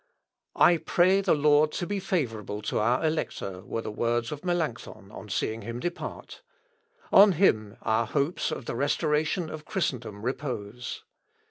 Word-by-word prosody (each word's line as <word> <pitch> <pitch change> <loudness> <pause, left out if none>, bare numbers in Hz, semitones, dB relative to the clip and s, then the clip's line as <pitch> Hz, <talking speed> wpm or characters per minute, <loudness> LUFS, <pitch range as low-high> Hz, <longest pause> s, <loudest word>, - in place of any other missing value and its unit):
"I 175 - +6
pray 185 +4 +3
the 190 -4 +3
Lord 150 +1 +4
to 175 - -2
be 200 +2 -2
favourable 115 - -2
to - - -1
our 120 +8 +2
Elector," 100 - -2
were 115 - -4
the - - -4
words 120 +3 -1
of 150 -1 -6
Melancthon 160 - -3
on 110 - -10
seeing 110 +3 -2
him 115 +3 -5
depart; 175 +5 -6 0.7
"on 200 0 +8
him 110 - +2
our 110 +1 +1
hopes 145 +6 0
of 130 - -5
the - - -3
restoration 150 +5 0
of 155 -1 -8
Christendom 120 - -3
repose. 125 -4 -4
140 Hz, 150 wpm, -27 LUFS, 110-170 Hz, 0.7 s, on